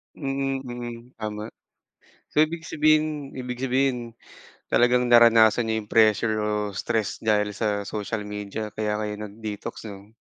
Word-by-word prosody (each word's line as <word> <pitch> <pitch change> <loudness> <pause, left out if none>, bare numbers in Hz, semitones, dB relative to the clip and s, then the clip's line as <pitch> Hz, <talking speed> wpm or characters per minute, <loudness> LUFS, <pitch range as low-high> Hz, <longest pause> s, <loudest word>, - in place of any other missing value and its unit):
Mm, 135 -1 -2
mm, 120 -1 -6 0.2
tama. 105 0 -5 0.8
So, - - +3
ibig 160 +1 +1
sabihin 155 -2 +1
ibig 125 -1 -5
sabihin 130 -3 0 0.6
talagang 125 +1 +4
naranasan 115 -1 +6
niya 110 - +1
'yong 105 - -14
pressure 110 0 +4
o 105 - -1 0.2
stress 110 +1 -2
dahil 105 -2 +1
sa 105 -2 -1
social 105 0 -3
media 105 +1 -5
kaya 105 -1 -1
kayo 105 -1 -3
nag-detox, 105 +1 -7
'no? 100 +2 -12
115 Hz, 135 wpm, -25 LUFS, 105-125 Hz, 0.8 s, naranasan